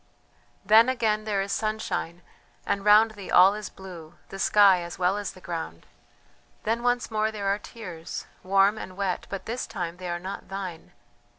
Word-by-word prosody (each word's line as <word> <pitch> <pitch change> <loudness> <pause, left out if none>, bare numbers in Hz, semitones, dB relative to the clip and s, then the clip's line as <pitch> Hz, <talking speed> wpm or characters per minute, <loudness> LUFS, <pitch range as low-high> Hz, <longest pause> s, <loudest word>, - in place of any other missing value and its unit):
"Then 220 +5 +7
again 220 -4 0
there 200 -2 0
is 200 - -6
sunshine, 215 -5 -2 0.4
and 200 - -1
round 210 +2 +6
thee 205 -3 -10
all 190 +2 +7
is 210 -1 -6
blue, 175 -4 -11
the 195 - -8
sky 195 -3 +5
as 170 0 -7
well 180 +2 +2
as 205 -1 -4
the 185 - -15
ground 165 - -6 0.8
then 225 +2 0
once 245 -1 0
more 215 0 +1
there 210 -2 -5
are 200 +1 +1
tears, 180 -8 -8 0.2
warm 195 +3 +3
and 185 -2 -8
wet, 195 -2 -2
but 195 - -5
this 240 +3 -4
time 170 0 -5
they 180 -1 -6
are 175 - -1
not 190 +3 -7
thine.... 190 -4 -6
195 Hz, 180 wpm, -26 LUFS, 180-215 Hz, 0.8 s, Then